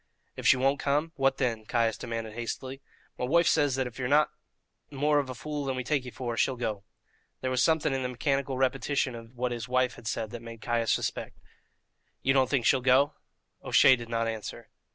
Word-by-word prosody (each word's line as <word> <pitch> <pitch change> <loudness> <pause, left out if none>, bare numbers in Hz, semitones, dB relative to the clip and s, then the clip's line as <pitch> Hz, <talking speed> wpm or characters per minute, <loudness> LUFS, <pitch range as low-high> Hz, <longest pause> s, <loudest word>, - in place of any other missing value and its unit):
"If - - -2
she 135 - +7
won't 135 +2 +2
come, 150 +3 0
what 135 -1 +2
then?" 115 -5 -1
Caius 115 0 +1
demanded 115 -1 -5
hastily. 130 +3 -5 0.4
"My - - 0
woife 170 +6 +3
says 145 -4 +3
that 130 -1 0
if 125 +1 -8
ye're 125 - -1
not 150 +3 +4 0.6
more 145 +2 +2
of 140 -2 -3
a 130 - -5
fool 150 +4 -4
than 135 -1 -2
we 130 - -3
take 140 0 0
ye - - -5
for, 120 -1 -4
she'll 130 +3 +1
go." 110 -5 -3 0.6
There 130 - -1
was 130 -1 +1
something 160 -3 +2
in 135 - -1
the 125 - -2
mechanical 135 +1 -1
repetition 135 0 0
of 115 +1 -11
what 125 0 -1
his 120 0 -5
wife 125 0 +1
had 110 - -10
said 110 +1 -2
that 120 - -7
made 115 -1 -9
Caius 115 -1 0
suspect. - - -2 0.9
"You 135 - +3
don't 130 -2 +3
think 130 -5 +1
she'll 130 - +4
go?" 130 +3 +4 0.5
O'Shea 130 -2 +6
did 120 -2 -9
not 115 -1 0
answer. 110 -2 -6
130 Hz, 215 wpm, -28 LUFS, 120-135 Hz, 0.9 s, she